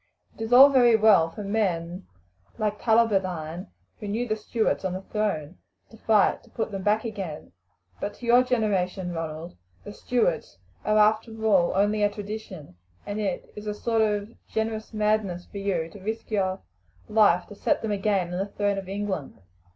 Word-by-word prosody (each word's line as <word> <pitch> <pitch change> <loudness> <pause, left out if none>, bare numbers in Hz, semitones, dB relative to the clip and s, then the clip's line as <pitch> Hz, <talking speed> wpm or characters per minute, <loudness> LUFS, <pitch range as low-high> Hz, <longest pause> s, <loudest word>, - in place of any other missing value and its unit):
It - - -13
is 225 +1 -4
all 265 +3 +10
very 245 -4 +5
well 210 -7 +5
for 205 +5 -8
men 185 -4 -2 0.5
like 210 -1 -2
Tullibardine, 185 -7 +1 0.3
who 210 - -6
knew 225 +4 -2
the 215 - 0
Stuarts 220 0 -1
on 190 -1 -2
the 185 +1 -5
throne, 190 -7 -3 0.3
to 225 - -14
fight 215 -2 +3
to - - -21
put 225 -1 -3
them 195 -1 -4
back 210 +4 +1
again; 195 -9 -6 0.5
but 205 - -4
to 245 - -10
your 240 +1 +6
generation, 200 -7 0
Ronald, 165 0 -5 0.3
the 205 - -9
Stuarts 210 - -1 0.3
are 215 0 +2
after 220 +1 +2
all 190 -5 +3
only 205 +2 +2
a 205 - +4
tradition, 200 - -8 0.3
and 205 +1 -4
it 195 -4 -3
is 210 0 -8
a 210 - -2
sort 225 +1 0
of 210 0 0
generous 220 0 -3
madness 210 -4 0
for 200 - -8
you 185 -5 -1
to 205 - -12
risk 220 +3 -5
your 190 -2 0 0.5
life 200 -5 +4
to - - -9
set - - 0
them 220 - -1
again 195 -3 0
on 180 - -2
the 195 - -1
throne 200 -1 -1
of 190 -1 -9
England. 195 - -4
205 Hz, 180 wpm, -26 LUFS, 185-220 Hz, 0.5 s, all